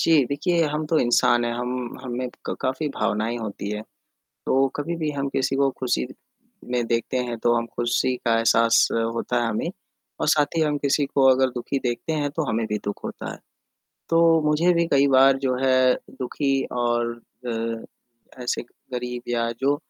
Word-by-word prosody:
जी, 155 -5 +4
देखिए 165 +5 +1
हम 155 +1 -2
तो 160 0 +2
इंसान 120 0 +3
हैं 120 - -1
हम 125 0 -4
हमें 125 0 -3 0.2
क - - -2
काफ़ी 140 +4 -1
भावनाएँ 110 +3 -1
होती 105 -2 -5
हैं। 105 0 -3 0.6
तो 135 +1 +3
कभी 165 +4 -2
भी 155 -2 -2
हम 140 -1 -2
किसी 135 0 0
को 140 0 +3
खुशी 125 -1 0 0.7
में 120 -2 +1
देखते 115 +2 0
हैं 120 -1 -4
तो 120 0 +4
हम 115 0 0
खुशी 120 +2 +1
का 115 -1 +3
एहसास 115 0 +4 0.3
होता 120 +1 0
है 120 - 0
हमें, 110 - -2 0.5
और - - -1
साथ 150 -1 +4
ही 160 - +3
हम 150 -1 +1
किसी 140 +1 +1
को 135 - +5
अगर 130 0 +4
दुखी 130 +3 -2
देखते 120 +6 -2
हैं 145 -2 0
तो 160 - 0
हमें 110 0 0
भी 105 - -1
दुःख 105 - -4
होता - - -5
है। - - -10 0.7
तो 165 -1 +5
मुझे 165 +4 +3
भी 170 0 +2
कई 140 0 +5
बार 135 0 +6
जो 130 -2 0
है 130 -1 +4 0.3
दुखी 135 +2 -1 0.2
और 120 -1 0 0.4
अ, 115 +2 -7
ऐसे 120 - -1 0.3
गरीब 125 0 -4
या 115 -1 0
जो 140 +2 +3
125 Hz, 185 wpm, -24 LUFS, 120-145 Hz, 0.7 s, बार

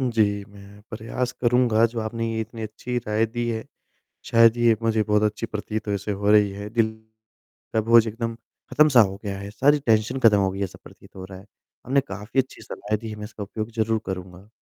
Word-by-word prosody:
जी, 105 -5 +1
मैं 100 0 -15
प्रयास 115 +3 -3
करूँगा 120 -2 +3
जो 115 0 -7
आपने 115 0 -3
इतनी 115 +1 -6
अच्छी 110 +3 -5
राय 105 +1 +1
दी 120 +1 -3
है। 110 -1 -3 0.6
शायद 115 0 +5
ये 120 -1 +4
मुझे 110 -1 +2
बहुत 105 0 +2
अच्छी 105 +2 -1
प्रतीत 110 -1 -5
ऐसे 100 0 -2
हो 100 +1 +1
रही 105 -1 +5
है 100 +1 -7
दिल 115 0 +1 0.8
का 110 - +3
भोज 115 +1 +5
एकदम 115 +1 -4 0.4
खत्म-सा 150 -5 +5
हो 95 -3 +2
गया 100 -1 -4
है। 100 +1 -7
सारी 140 +8 +3
टेंशन 115 +3 +2
ख़त्म 110 -4 +6
हो 95 -1 +2
गई 95 - -7
है 100 - 0
ऐसा 95 - -9
प्रतीत - - -17
हो 95 - -7
रहा 95 0 -10
है। 95 - -14 0.4
आपने 135 +3 +3
काफ़ी 105 0 -2
अच्छी 130 - -8
सलाहें 105 +1 -4
दी 115 +1 -8
हैं। 105 - -7
मैं 105 - -7
इसका 105 0 -8
उपयोग 110 +2 -5
ज़रूर 110 0 +1
करूँगा। 90 +1 -7
110 Hz, 210 wpm, -24 LUFS, 105-115 Hz, 0.8 s, ख़त्म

